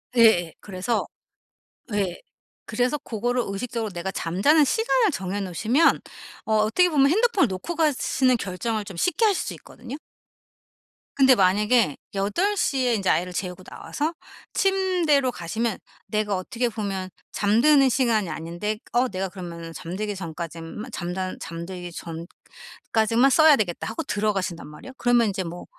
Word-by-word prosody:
예예. 220 -8 +5
그래서 205 +4 -2 0.9
예. 195 -4 -1 0.5
그래서 250 +4 0
고거를 245 -2 -2
의식적으로 220 +2 -3
내가 180 +1 -4
잠자는 200 - +3
시간을 445 - +2
정해 190 -5 -3
놓으시면 220 - +2 0.5
어 220 - 0
어떻게 220 +13 +3
보면 280 -4 +4
핸드폰을 420 - +3
놓고 190 - -5
가시는 270 -5 +2
결정을 210 +2 -3
좀 190 - -9
쉽게 365 - +2
하실 405 -4 +2
수 - - -5
있거든요. 250 +3 -10 1.2
근데 265 -2 +6
만약에 210 - +3 0.2
8:00 300 - 0
에 240 - +3
인제 195 -3 0
아이를 180 +1 +1
재우고 180 +1 -4
나와서 305 - -4 0.4
침대로 360 -9 +2
가시면 220 +3 -2 0.3
내가 210 -2 0
어떻게 235 +6 -2
보면 195 -4 -4 0.2
잠드는 260 +7 +4
시간이 230 -7 +1
아닌데 175 +6 -4 0.2
어 245 +2 +3
내가 190 0 -3
그러면은 170 -3 -8
잠들기 200 +6 -4
전까지만 170 +5 -7
잠단 185 0 -4
잠들기 175 +1 -7
전까지만 220 +8 -2
써야 315 +2 +7
되겠다 190 -8 -2
하고 225 - -4
들어가신단 200 -5 -2
말이야. 150 - -11
그러면 240 -1 +3
인제 195 -1 -2
뭐 175 0 -7
215 Hz, 330 characters per minute, -24 LUFS, 185-260 Hz, 1.2 s, 써야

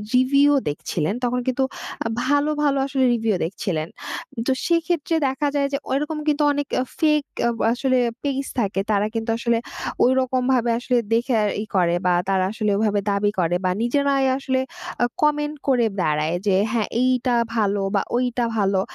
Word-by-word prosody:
Review 280 +3 +4 0.2
দেখছিলেন, 155 +4 -2
তখন 250 +1 +1
কিন্তু 255 +1 +1 0.6
ভালো, 290 +3 +2
ভালো 280 -1 +2
আসলে 270 -1 0
রিভিউ 225 -3 +1
দেখছিলেন। 165 -3 -3 0.6
তো - - +3 0.2
সেক্ষেত্রে 335 -1 +1
দেখা 270 +2 -1
যায় 280 -1 +2
যে, - - +2
ওইরকম 300 +3 -1
কিন্তু 295 0 +2
অনেক 285 -1 -2 0.3
ফেক 300 -2 +3 0.2
আ - - +2 0.2
আসলে 255 0 +1 0.2
পেজ 275 -1 -1
থাকে। 195 -3 0
তারা 205 +1 +2
কিন্তু 225 0 -2
আসলে 235 0 +1 0.5
ওইরকমভাবে 255 -1 +2
আসলে 250 0 0 0.2
দেখে 240 +2 +1 0.3
ইয়ে 215 - -7
করে 175 -2 +3
বা 180 - +4 0.2
তারা 190 -1 +2
আসলে 215 -2 -1
ওইভাবে 210 -1 +1
দাবি 205 +1 +1
করে 175 0 +1
বা - - +3
নিজেরাই 275 +2 +2
আসলে 260 -1 -1 0.4
আ - - +5 0.2
কমেন্ট 295 0 +1
করে 245 -4 +3 0.2
দাঁড়ায় 155 +2 0
যে, 190 - +4 0.2
হ্যাঁ, 225 -3 0
এইটা 255 -1 +2 0.2
ভালো, 205 -2 +1
বা 200 - +3 0.2
ওইটা 245 -1 0
ভালো। 195 -2 +2
250 Hz, 160 wpm, -22 LUFS, 205-275 Hz, 0.6 s, আ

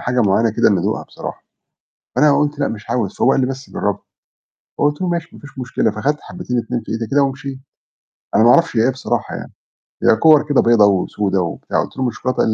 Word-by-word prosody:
حاجة 125 0 0
معينة 110 +3 +2
كده 110 - +3
إن 100 -3 +2
أدوقها - - -1
بصراحة، - - -8 0.7
فأنا 150 -1 +4
قُلت: 150 0 0
"لأ 140 - +1
مش 110 -1 -7
عاوز." 110 -6 -1
فهو 135 - +3
قال - - +2
لي: - - +2
"بس 135 +1 -6
جرّبها"، 100 -1 -2 0.8
فقُلت 145 0 +1
له: 185 - -1
"ماشي 170 -1 -3
مفيش 145 -2 -14
مشكلة،" 125 -2 0
فخدت 140 +8 -1
حبتين 125 -9 -5
2 120 +1 -2
في 110 - -7
إيدي 115 0 -3
كده 140 +5 +2
ومشيت، 135 0 -3 0.8
أنا - - +5
ما 120 - +7
اعرفش 170 -1 +3
هي 110 - +4
إيه 130 - +3
بصراحة 130 0 -3
يعني، - - -9 0.5
هي - - +5
كِوَر 155 +5 +5
كده 145 - +4
بيضا 115 -3 +5
وسودا 100 0 0
وبتاع، 85 -4 -2
قُلت - - -11
له: 130 - -1
"مش 120 -3 -2
شوكولاتة؟" 130 +2 -3
قال - - +3
125 Hz, 220 wpm, -18 LUFS, 110-145 Hz, 0.8 s, ما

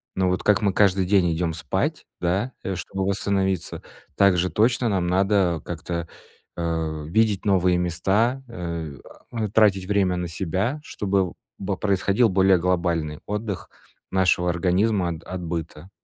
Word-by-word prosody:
ну, 95 -1 +1
вот 90 0 0
как 105 0 +3
мы 100 -3 +1
каждый 95 -2 +3
день 90 -3 +3
идём 85 0 -1
спать, 75 -3 -2
да, 95 +9 0
э, 95 - -2
чтобы 95 +3 -4
восстановиться, 95 -2 -1 0.4
так 100 -2 +5
же 90 +1 +1
точно 120 +2 +2
нам 95 -4 0
надо 95 -2 +2
как-то, 85 0 -4 0.5
э, 80 -2 -2
видеть 105 +2 +1
новые 90 -3 +3
места, 95 +9 +1
э, 85 -8 -5 0.3
а, 110 -2 -2
тратить 100 -3 +3
время 95 -2 +1
на 90 0 -2
себя, 95 - -2
чтобы 100 -7 0
в - - -13 0.3
б 95 -1 -2
происходил 100 +4 +2
более 95 0 +4
глобальный 85 -4 0
отдых 105 -2 -4 0.4
нашего 90 -2 +2
организма 90 +3 +1
от 85 -1 -6
от 95 -1 -6
быта. 85 +1 -5
95 Hz, 150 wpm, -24 LUFS, 85-100 Hz, 0.5 s, так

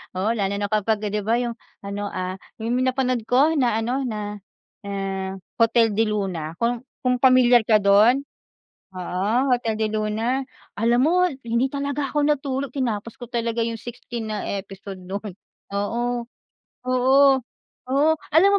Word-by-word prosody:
Oo 200 +5 +1
lalo 200 -2 0
na 205 0 -1
kapagka, 215 0 +1
'di 210 - 0
ba 230 +2 +3
yung 235 -1 -3 0.3
ano, 200 +1 -4
ah, 185 0 -3 0.3
yung 240 +2 0
napanood 255 -2 0
ko 275 +6 +5
na 240 -4 +2
ano, 250 +4 -1
na 210 -2 -4 0.5
ah 195 -1 -3 0.2
Hotel 230 -1 +4
del 220 -1 +2
Luna 170 -6 -3
kung 240 +1 0 0.2
kung 250 -1 +2
pamilyar 250 -3 +6
ka 215 -2 +5
dun, 215 +7 +5 0.7
oo, 185 +1 -3 0.3
Hotel 230 -3 0
del 215 0 0
Luna, 225 +5 0 0.3
alam 235 +3 +3
mo 360 +4 +4 0.2
hindi 235 +3 +1
talaga 280 0 -2
ako 295 -1 +1
natulog 275 -3 -1
tinapos 230 -4 -2
ko 245 - -6
talaga 235 -1 -1
yung 230 -1 -3
16 240 -1 -7
na 210 - -3 0.2
episode 195 0 -9
non, 200 +3 -5 0.5
oo. 235 +4 -1 0.6
Oo, 265 +2 +5 0.5
oo, 285 +4 +3 0.2
alam 360 +5 +6
230 Hz, 150 wpm, -23 LUFS, 205-255 Hz, 0.7 s, pamilyar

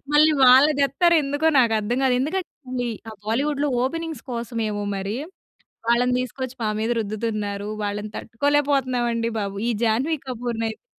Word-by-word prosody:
మళ్ళీ 305 +1 +6
వాళ్ళని 265 +4 +7
దెత్తారు 340 +5 +3
ఎందుకో 290 +3 -1
నాకు 235 -3 +4
అర్థం 230 +4 -1
కాదు. 255 - +3
ఎందుకంటే 270 -6 -3 0.2
ఆ - - -8
బాలీవుడ్‌లో 285 +6 0
ఓపెనింగ్స్ 325 +4 -3
కోసమేమో 230 -3 -3
మరి. 195 +2 -3 0.7
వాళ్ళని 245 +1 +3
తీసుకొచ్చి 255 +1 -5
మా 215 - +1
మీద 225 - -1
రుద్దుతున్నారు, 210 -1 -3
వాళ్ళని 205 +1 -3
తట్టుకోలేకపోతున్నాం 270 -1 +1
అండి 230 0 -1
బాబు! 200 -1 -4
ఈ - - +2
జాహ్నవి 265 +8 +1
కపూర్‌నైతే 235 - -5
245 Hz, 135 wpm, -23 LUFS, 220-285 Hz, 0.7 s, వాళ్ళని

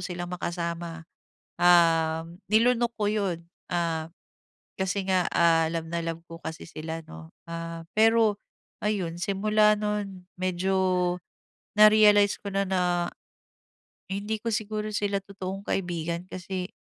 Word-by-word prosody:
silang 175 -1 -5
makasama, 170 -2 -4 0.6
um 165 -1 +4
nilunok 235 +2 +3
ko 210 - -1
'yon. 200 -5 0 0.3
Ah, 165 -2 -1 0.7
kasi 190 0 -1
nga, 185 -2 +2
ah, 165 -1 +4
love 165 -1 -2
na 170 0 -2
love 165 0 -4
ko 165 0 -10
kasi 160 - -6
sila, 160 +1 -5
'no. 80 0 -11 0.2
Ah, 165 0 -6
pero 220 -2 +5 0.4
ayun 190 -6 -1
simula 210 +2 +3
no'n, 205 -3 -3
medyo 185 0 +1 0.6
na-realize 210 -1 +6
ko 200 - -6
na 195 0 +1
na 185 -1 +1 1.3
hindi 205 +3 -2
ko 230 - -2
siguro 215 0 -2
sila 200 -1 0
totoong 195 0 -6
kaibigan 170 -2 -2
kasi 185 0 -5
185 Hz, 120 wpm, -27 LUFS, 170-205 Hz, 1.3 s, na-realize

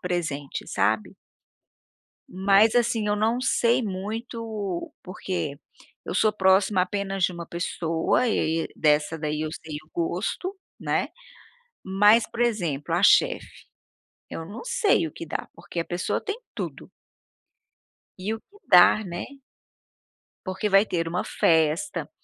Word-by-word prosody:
presente, 160 -6 -3
sabe. 105 +2 0 1.1
Mas, 195 +4 +4
assim, 235 -3 +2
eu 205 - +2
não 225 +4 +1
sei 245 -1 +2
muito, 215 -1 -4
porque 170 -5 -4 0.5
eu - - -4
sou 215 -1 +3
próxima 190 -1 +3
apenas 195 0 -2
de 180 - +3
uma 170 -1 -7
pessoa 170 +6 0
e 220 - +1 0.2
e - - +1
aí - - -4
dessa 150 +1 +2
daí 150 0 -2
eu 155 - -2
sei 160 -2 -7
o 155 - -26
gosto, 180 - -2 0.2
né. - - -1 0.7
Mas, 205 +4 +5
por 235 - -4
exemplo, 175 - -1
a - - +1
chefe, - - +3 0.6
eu 165 - -6
não 200 +7 -8
sei 480 - +2
o 150 - -8
que - - -7
dar, - - -4
porque 170 0 -6
a 165 - -2
pessoa 175 +1 -2
tem 415 +2 -4 0.2
tudo. - - -6 1.3
E - - -7
o - - -10
que 410 - -23
dar, 215 - +6
né 175 -1 -5 1.2
porque 190 +3 -2
vai 195 +1 +5
ter 165 -5 -2
uma 175 +2 -1
festa, 160 - +1
190 Hz, 140 wpm, -25 LUFS, 165-220 Hz, 1.3 s, dar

